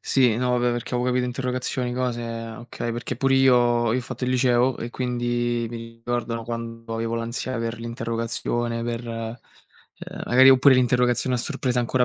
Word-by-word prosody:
Sì, 125 -5 +3
no 125 0 0
vabbè 120 0 +2
perché 120 +1 -4
avevo 125 +1 +1
interrogazioni, 125 0 -2
cose 125 -1 -2 0.3
okay, 120 0 -5
perché 120 0 -4
pure 135 +3 +2
io 120 -3 +4
io 125 - +1
ho - - -1
fatto 125 +1 -5
il 125 - 0
liceo 125 0 +2
e 120 - -4
quindi 120 -1 -1
mi 120 - -6 0.2
ricordano 115 0 -3
quando 115 0 -6
avevo 115 0 -2
l'ansia 115 +2 -3
per 115 0 -3
l'interrogazione 115 0 -2
per 120 0 -3
uhm, 115 0 -9
magari 130 +2 +6
oppure 135 +1 +7
l'interrogazione 125 0 +2
a - - -2
sorpresa, 125 -1 -1
ancora 125 +1 +2
120 Hz, 165 wpm, -24 LUFS, 115-125 Hz, 0.3 s, oppure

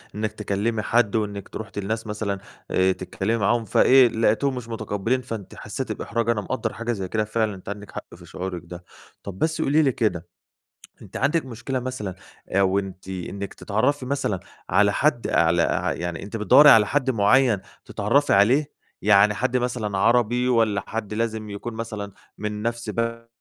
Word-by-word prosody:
إنِّك 110 0 -2
تكلّمي 105 +1 -2
حد 115 -2 +2
وإنِّك 100 -2 -2
ت - - -13
رُحتِ 105 -2 -6
لناس 110 +3 -3
مثلًا 105 -2 -3 0.3
آآ، 95 0 +3
تتكلمي 115 +3 -2
معاهم 115 +2 +1
فإيه، 130 +5 +6
لقيتيهم 115 +4 +1
مش 120 -2 -6
متقبلين 110 +3 -1
فأنتِ 110 -5 -7
حسيّتِ - - -5
بإحراج. 115 0 -2
أنا 110 -3 +1
مقدّر 115 -1 -3
حاجة 115 +1 -3
زي 95 -5 -3
كده 110 +3 0
فعلًا، 110 -1 -1
أنتِ 95 - -10
عندِك 100 0 -7
حق - - -9
في - - -14
شعورِك 90 -2 -5
ده. 90 +1 -10 0.4
طب، 95 -2 -8
بس 160 0 0
قولي 150 +2 +3
لي 135 -3 +3
كده، 90 -8 -1 0.8
أنِت - - -10
عندِك 140 +1 +1
مشكلة 130 +2 -4
مثلًا 120 -7 -4 0.3
آآ، 100 - +1
أو 95 +1 +3
أنتِ 95 -1 -6
إنِّك 95 +2 -5
تتعرفي 125 +6 0
مثلًا 130 -9 -1 0.3
على 100 -1 +4
حد 140 -3 +1
على 85 +1 +3
ع - - 0
يعني 85 0 -4
أنتِ 105 +3 -6
بتدَوّري 145 +7 +7
على 105 -2 +7
حد 135 0 +1
مُعين 115 +1 +4 0.3
تتعرفي 125 +8 +1
عليه؟ 125 +9 +4 0.3
يعني 105 +1 +5
حد 130 +4 0
مثلًا 115 -5 -2
عربي 120 +3 +3
والّا 110 -5 +2
حد 110 -2 -4
لازم 110 -1 -2
يكون 110 +3 -6
مثلًا 110 -3 -5 0.3
من 105 0 -4
نفس 115 -1 -3
ب 115 +1 -3
110 Hz, 175 wpm, -24 LUFS, 100-120 Hz, 0.8 s, بتدَوّري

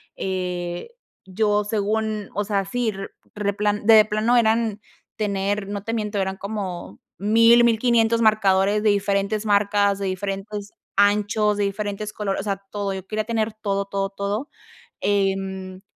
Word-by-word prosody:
eh, 180 - -3 0.4
yo 210 +2 +1
según, 215 0 -2
o 205 - -1
sea, 200 -1 -1
sí, 240 +4 -1
re 195 -1 -7 0.3
replan 205 0 -1
de 220 -1 +8
plano 215 +3 +2
eran 220 -2 +2 0.4
tener, 200 -1 -1
no 200 -1 -5
te 225 +2 -3
miento 210 -2 -2
eran 190 0 -1
como 200 -4 -5 0.2
1000, 230 +4 +5
1500, 230 0 +3
marcadores 205 -1 +3
de 215 - +3
diferentes 200 +1 0
marcas, 200 -1 +2
de 195 - -2
diferentes 195 +2 -4 0.3
anchos, 210 +1 +3
de 205 - +1
diferentes 205 +1 -3
colores. 200 -2 -2
O - - -8
sea, 200 -2 -1
todo. 205 -1 -2
Yo 190 -1 -6
quería 215 +1 -2
tener 225 -1 -1
todo, 200 -2 -2
todo, 195 0 -2
todo, 200 +7 -3 0.5
em, 195 -2 -1
205 Hz, 145 wpm, -23 LUFS, 195-215 Hz, 0.5 s, de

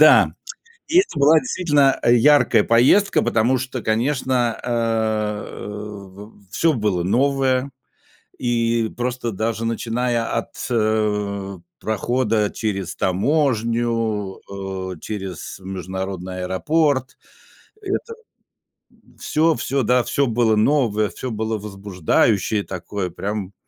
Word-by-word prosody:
Да, - - +7 0.6
и 335 +4 +4
это 370 - +1
была 150 +3 +6
действительно, 145 -1 +2
а, - - 0
яркая 130 -2 +5
поездка, 130 - +4
потому 120 +4 +2
что, 130 -1 -5
конечно, 120 0 0
э, 110 -3 -1 0.3
в 105 -1 -10
всё 165 +9 +2
было 105 -6 0
новое, 135 +5 +1 0.7
и 115 -2 0
просто 125 -1 -2
даже 110 +3 -2
начиная 115 +1 -1
от, 115 - -3
э, 105 -3 0 0.2
прохода 110 0 0
через 100 -5 -3
таможню, 115 - 0
э, 95 -1 -5
через 95 -6 -6
международный 95 0 -5
аэропорт, 130 - 0 0.6
это, 415 +4 -3 0.9
м, - - -25
всё 160 +1 +1
всё, 135 -1 -1
да, 125 +3 +3
всё 140 - +1
было 115 -1 +2
новое, 110 -3 +2
всё 130 - -6
было 110 0 -2
возбуждающее 100 0 0
такое 95 +1 -5
прям. 100 +2 -4
110 Hz, 105 wpm, -21 LUFS, 100-125 Hz, 0.9 s, Да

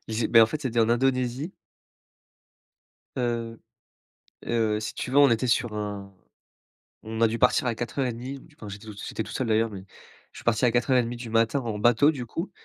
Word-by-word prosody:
Ils 110 - -5
zé 115 - 0
mais 115 - +7
en - - +6
fait, 150 +6 -5
c'était 120 -4 0
en 110 - +3
Indonésie 130 +5 0 1.6
Heu 115 -2 -2 0.9
heu, 110 -2 +1
si 110 - -5
tu 125 - -4
veux, 140 - +2
on 145 -1 +7
était 115 +2 +1
sur 120 -2 +1
un 100 -2 -5 0.9
on 110 +1 -5
a 115 - +6
dû 115 +1 -2
partir 125 0 +3
à 115 - 0
04:30 125 +2 -3
du 155 +1 -20
enfin, 105 - -9
j'étais 100 +2 -9
tout 105 - -7
sui 100 - -8
j'étais 110 - -3
tout - - -10
seul 130 - -2
d'ailleurs 110 +1 +2
mais 95 -2 -8 0.5
je - - -15
suis - - -13
parti 120 +1 +2
à 120 - +4
04:30 120 0 +1
du 120 -1 -8
matin 115 +4 +2
en 110 -4 -4
bateau, 120 +6 +5
du 130 -5 -6
coup, 165 - -5
115 Hz, 210 wpm, -26 LUFS, 110-125 Hz, 1.6 s, mais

